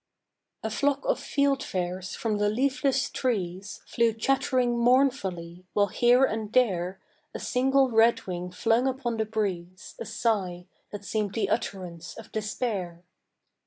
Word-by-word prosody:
A 220 - -2
flock 280 - 0
of - - +1
fieldfares 190 - -1
from 215 -3 -1
the 205 0 +2
leafless 265 +3 +1
trees 195 -5 -3
Flew 230 -1 +1
chattering 250 +1 +1
mournfully, 235 -9 +1
while 205 -1 +2
here 245 +5 +4
and 220 -3 -3
there 190 -7 +1 0.4
A - - -3
single 265 +1 +2
redwing 195 -6 +2
flung 225 +7 +1
upon 255 -3 -2
the 220 - 0
breeze 190 -4 -4
A - - -5
sigh 205 -5 -1 0.3
that 205 -1 -7
seem'd 210 -2 -2
the 225 - 0
utterance 175 -4 -4
of 225 - -11
despair. 205 -5 -3
220 Hz, 130 wpm, -27 LUFS, 185-250 Hz, 0.4 s, here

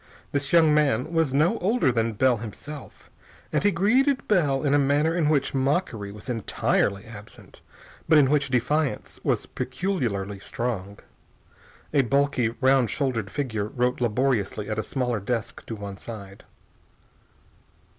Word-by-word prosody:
This 140 -1 -1
young 160 -3 +5
man 150 -1 +1
was 160 -4 +2
no 160 - +2
older 195 - +2
than 115 -1 0
Bell 125 +3 +3
himself, 130 +7 -9 0.4
and - - +1
he 205 - +5
greeted 250 +9 +2
Bell 150 -9 +2
in 145 -1 +2
a 145 - +5
manner 145 +4 +2
in 160 -4 +2
which 145 -3 +1
mockery 135 - -1
was 105 +3 -11
entirely 100 -4 0
absent, 110 -1 -12 0.5
but 160 - +7
in 140 -2 +5
which 140 -2 +2
defiance 140 +4 -1
was - - 0
peculiarly 120 - -3
strong. 100 -3 -4 1.0
A 145 - +5
bulky, 140 -1 +1
round 130 -3 +4
shouldered 125 -8 -1
figure 115 -7 -2
wrote 125 +2 -1
laboriously 115 -3 0
at 110 - -1
a - - -1
smaller 125 -4 -1
desk 115 +2 -3
to 115 - -4
one 100 -2 -7
side. 100 -4 -10
130 Hz, 145 wpm, -25 LUFS, 110-150 Hz, 1.0 s, but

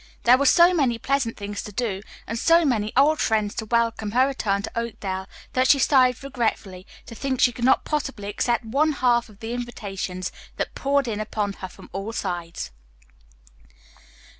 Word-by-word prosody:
There 250 +2 +6
were 280 - +3
so 345 +5 +6
many 265 -9 +2
pleasant 265 -2 -1
things 205 0 -5
to 210 - -8
do 205 -3 -2 0.2
and 230 +1 -4
so 335 +3 +4
many 215 -6 0
old 300 +3 +5
friends 215 -1 +1
to 220 - -5
welcome 230 -2 0
her 255 +2 +5
return 205 -7 -1
to - - -5
Oakdale 195 -5 -4 0.3
that 255 0 +3
she 280 - +6
sighed 260 -2 +3
regretfully 220 -8 -3 0.2
to - - -10
think 260 +2 -2
she 245 - +5
could 240 0 -3
not 265 - +4
possibly 270 -9 -3
accept 235 +3 0
one 290 +7 +2
half 240 -3 +2
of 205 -2 -18
the 225 +1 -4
invitations 195 -6 -5 0.3
that - - -3
poured 280 -1 +1
in 215 -2 -2
upon 210 -1 -2
her 190 - -7
from - - -14
all 195 +4 -4
sides. 175 - -4
235 Hz, 180 wpm, -24 LUFS, 205-260 Hz, 0.3 s, There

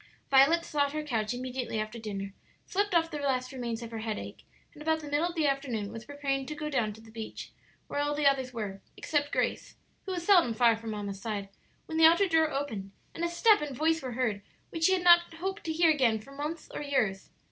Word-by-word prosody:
Violet 280 +5 +5
sought 285 -1 0
her 305 0 -2
couch 225 -7 -1
immediately 250 -2 -3
after 215 +2 -4
dinner, 200 -3 -5 0.3
slept 405 -1 0
off 330 0 +3
the 300 - -4
last 255 -3 -1
remains 240 -3 -4
of 230 - -8
her 225 - -5
headache, 220 -1 -5 0.3
and 300 - -14
about 320 +1 +1
the 300 - -8
middle 290 +4 +1
of 350 - -6
the 320 -2 +1
afternoon 260 -7 -1
was 225 0 -8
preparing 275 -2 -2
to 305 - -5
go 300 0 -4
down 235 -6 +1
to 220 - -14
the 225 0 -15
beach, 220 -1 -7 0.3
where - - -3
all 290 0 0
the 295 0 -1
others 265 -2 +3
were, 205 -5 -5 0.2
except 290 -2 -1
Grace, - - -1 0.3
who - - -2
was 350 -2 -4
seldom 345 - +5
far 235 -1 +5
from 225 0 -7
mamma's 200 -2 -5
side, 205 -3 -4 0.4
when 320 0 -3
the 325 - +8
outer 340 +5 +4
door 320 -2 +3
opened, 255 -9 -4 0.2
and 335 - -5
a 345 - +1
step 415 +4 +4
and 285 -4 -4
voice 320 +2 +2
were 255 -2 -5
heard 230 -5 -1 0.3
which 325 -1 0
she 380 - +5
had 365 -1 0
not 345 -1 +6
hoped 385 +4 -4
to 325 - -1
hear 325 0 +4
again 255 -7 +3
for 220 +6 -14
months 300 +3 -5
or - - -4
years. 220 -10 -1
275 Hz, 235 wpm, -29 LUFS, 225-320 Hz, 0.4 s, the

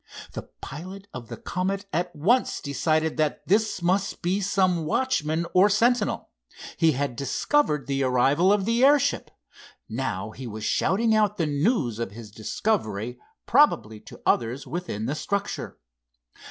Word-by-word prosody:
The - - -8
pilot 185 +8 -8
of 120 -2 -7
the - - -7
Comet 195 +2 -2
at 175 +1 -1
once 220 - +2
decided 155 +2 0
that 155 -1 -1
this 205 -1 +1
must 190 +3 0
be 185 +4 +1
some 185 -3 +1
watchman 160 -6 0
or 190 +3 +6
sentinel. 225 +2 +1 0.4
He 160 -2 +3
had 135 -1 -2
discovered 150 - +1
the 140 0 -1
arrival 135 +8 +3
of 205 -2 +2
the 230 +3 +2
airship. 280 0 +3 0.6
Now 110 -4 -3
he 130 +2 -8
was 110 -1 -7
shouting 220 +4 +2
out 210 -1 +2
the 165 - +1
news 145 - 0
of 115 -4 -4
his 110 -1 -10
discovery, 110 - -2 0.3
probably 225 - +3
to - - -13
others 120 +4 +1
within 165 - -4
the 135 - -1
structure. 200 +6 -3
165 Hz, 145 wpm, -25 LUFS, 130-200 Hz, 0.6 s, or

